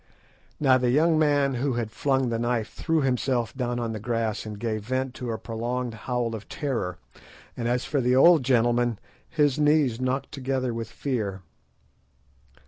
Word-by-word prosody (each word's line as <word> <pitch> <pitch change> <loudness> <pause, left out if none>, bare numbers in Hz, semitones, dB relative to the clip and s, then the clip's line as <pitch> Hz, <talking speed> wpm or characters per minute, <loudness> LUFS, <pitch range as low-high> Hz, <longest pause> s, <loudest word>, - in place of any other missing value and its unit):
Now 130 -3 +4
the 125 -1 +1
young 155 +5 +3
man 145 -3 +3
who 135 -1 +1
had 115 -2 -2
flung 135 -1 +1
the 115 -1 -1
knife 120 -2 -1
threw 160 -1 0
himself 125 -3 0
down 120 -2 -2
on 115 -1 -2
the 110 - -4
grass 115 -1 -2
and 105 -1 -6
gave 110 -1 -3
vent 130 +2 -2
to 125 -2 -6
a 115 - -2
prolonged 120 +2 -3
howl 120 +1 -2
of 110 -2 -7
terror; 115 - -3 0.6
and 120 - -3
as 125 +1 0
for 140 - 0
the 125 +1 +2
old 165 +4 +7
gentleman, 120 -2 +2 0.3
his 150 -3 +2
knees 150 -5 +3
knocked 130 +2 -1
together 130 -2 -2
with 115 -1 -5
fear. 110 -7 -3
125 Hz, 170 wpm, -26 LUFS, 115-135 Hz, 0.6 s, old